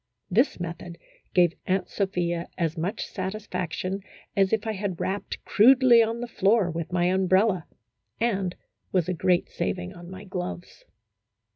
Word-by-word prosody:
This 240 +6 +2
method 170 0 -6 0.4
gave 175 -2 +5
Aunt 185 0 +1
Sophia 175 -4 -1
as 165 -2 0
much 180 +7 -2
satisfaction 190 -1 -4 0.3
as 195 -1 +3
if 220 0 +1
I 220 - 0
had 195 -4 -3
rapped 200 +2 -3
crudely 250 +1 +6
on 230 +1 0
the 240 - -3
floor 205 -3 +2
with 165 +1 -4
my 175 0 +2
um 190 0 +1
brella, 185 -2 +3 0.5
and 195 -6 0 0.4
was 180 -4 +1
a 185 - 0
great 180 0 +2
saving 180 0 -3
on 175 -1 -11
my 185 +1 -9
gloves. 180 -2 -6
185 Hz, 150 wpm, -26 LUFS, 175-205 Hz, 0.5 s, crudely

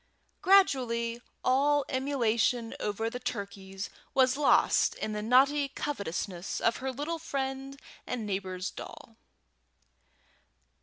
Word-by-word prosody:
Gradually 240 -11 +3 0.2
all 285 +2 +3
emulation 245 -3 0
over 210 +2 -2
the 245 +2 -4
turkeys 200 -4 -5 0.2
was 260 -1 +4
lost 290 0 +4
in 215 - -4
the 210 - -3
naughty 275 +5 +4
covetousness 200 - -4
of 230 - +2
her 265 0 -3
little 295 +6 -3
friend 270 -2 -4 0.3
and 235 -3 -3
neighbour's 190 -1 -3
doll. 225 - -10
250 Hz, 105 wpm, -30 LUFS, 210-275 Hz, 0.3 s, was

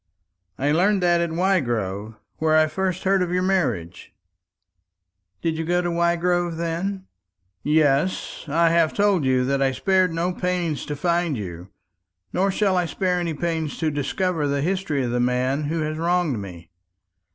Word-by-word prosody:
"I 140 +2 +1
learned 190 +4 +2
that 175 -1 +3
at 170 - 0
Wygrove, 120 - -1 0.2
where 155 0 +3
I 155 - +5
first 185 +3 -2
heard 195 0 +2
of 180 - 0
your 180 +1 0
marriage." 125 - -1 1.3
"Did 160 -1 -1
you - - -1
go 175 +2 +1
to 175 - -1
Wygrove, 170 0 +1
then?" 175 +4 -3 0.6
"Yes; 150 +2 +1
I 165 +3 +3
have 165 -2 +2
told 200 -7 +2
you 130 -1 +2
that 140 +1 0
I 135 -1 +3
spared 185 +5 +2
no 170 +2 -1
pains 175 -4 -2
to 150 - -3
find 170 -1 0
you. 90 -2 -7 0.6
Nor 195 +2 +2
shall 195 -1 +1
I 180 -1 +1
spare 180 +3 0
any 170 -3 -2
pains 160 -1 -2
to 160 -2 0
discover 150 +2 -1
the 140 0 0
history 175 -6 -1
of 120 - -2
the 125 - 0
man 125 +4 0
who 160 +2 -1
has 155 0 -3
wronged 170 -7 +1
me. 90 -4 -10
165 Hz, 165 wpm, -23 LUFS, 140-180 Hz, 1.3 s, I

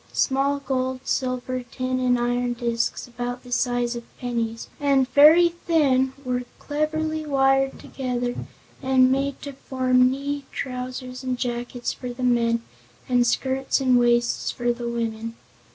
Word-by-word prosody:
Small 275 +1 +1
gold, 260 -2 -2
silver, 255 -1 -1
tin 255 +1 -3
and 250 -1 +2
iron 245 0 0
discs, 235 0 -2
about 245 +1 -5
the 250 - -12
size 245 -1 0
of 235 - -6
pennies, 230 -2 -3
and 275 -3 +3
very 320 +4 +7
thin, 290 -6 +1
were 250 0 -1
cleverly 310 +1 -2
wired 270 -2 +2
together 245 -2 -3 0.5
and 260 -1 +4
made 275 +1 0
to 280 - -6
form 255 -1 +2
knee 280 +1 -3
trousers 255 0 -5
and 255 -1 -2
jackets 245 0 -3
for 250 - -7
the 245 +1 -6
men 235 -1 +2 0.4
and 245 -1 +3
skirts 265 +3 0
and 255 -2 +4
waists 240 0 +2
for 240 0 0
the 240 0 -5
women. 230 -1 -3
255 Hz, 140 wpm, -24 LUFS, 245-270 Hz, 0.5 s, very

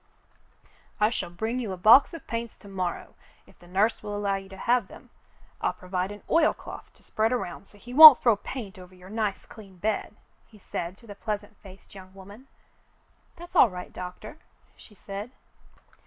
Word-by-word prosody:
"I 210 +1 +3
shall 200 - -4
bring 220 +8 -3
you 225 -6 -4
a - - -7
box 220 +9 +6
of 330 - -11
paints 230 -1 -5
to - - -16
morrow 185 -3 -5 0.3
if - - -23
the 175 - -18
nurse 200 +5 0
will 205 -1 -5
allow 200 -1 -1
you 195 0 -8
to 190 - -11
have 235 0 +1
them. - - -15 0.5
I'll - - 0
provide 185 0 -4
an 205 - -11
oilcloth 325 -1 -1
to - - -26
spread 220 +2 -1
around 200 -6 -4
so 205 - -19
he 240 +4 -11
won't 305 -1 +11
throw 235 -3 +3
paint 205 -2 -8
over 180 0 -14
your 185 +1 -14
nice 215 -3 -3
clean 200 -5 -15
bed," 215 +5 -3 0.3
he 220 - -19
said 185 -2 -6
to 235 - -20
the 205 - -9
pleasant 210 0 -5
faced 190 -1 -16
young 190 -1 -14
woman. 200 +7 -14 0.9
"That's 345 +1 -13
all 250 - +6
right, 180 -1 -9
Doctor," 180 +11 -9 0.4
she 210 - -18
said. 200 +3 -8
205 Hz, 185 wpm, -26 LUFS, 190-230 Hz, 0.9 s, won't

